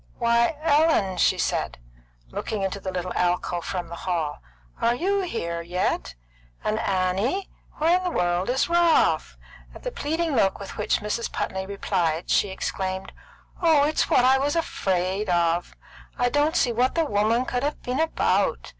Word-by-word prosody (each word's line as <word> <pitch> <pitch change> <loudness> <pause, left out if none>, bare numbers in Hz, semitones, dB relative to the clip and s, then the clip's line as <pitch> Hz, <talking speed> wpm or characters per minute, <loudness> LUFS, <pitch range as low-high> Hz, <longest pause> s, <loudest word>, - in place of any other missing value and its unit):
"Why, 235 +5 +2
Ellen!" 295 - +3
she - - +3
said, - - -1 0.5
looking 210 - -3
into 195 +1 -2
the 190 -1 -4
little 180 0 -3
alcove 175 -1 0
from 180 -3 -3
the 170 - -9
hall. 165 -5 -2 0.4
"Are 235 +1 +3
you 390 +8 0
here 170 - -3
yet? 175 - -2 0.5
And 215 +1 0
Annie! 195 - 0 0.2
Where 335 +4 +3
in - - -7
the 360 - 0
world 175 - 0
is 260 +2 +1
Ralph?" 340 -1 +3 0.4
At - - -12
the - - -3
pleading 320 - -1
look 195 -5 +2
with 200 - -8
which 210 - 0
Mrs. 210 +3 -2
Putney 190 0 -3
replied, 180 -5 -1
she 205 - +3
exclaimed: 190 0 -4 0.5
"Oh, 320 -4 +5
it's 305 +2 +1
what 250 - +4
I 265 +1 +5
was 285 +3 0
afraid 195 - -1
of! 170 0 +1 0.4
I 245 - +2
don't 295 +4 +1
see 245 - +2
what 245 +3 +1
the 330 -1 +2
woman 220 +1 +1
could 245 -1 -2
have 290 +2 -3
been 250 +3 -2
about! 200 - +1
215 Hz, 165 wpm, -25 LUFS, 185-290 Hz, 0.5 s, Oh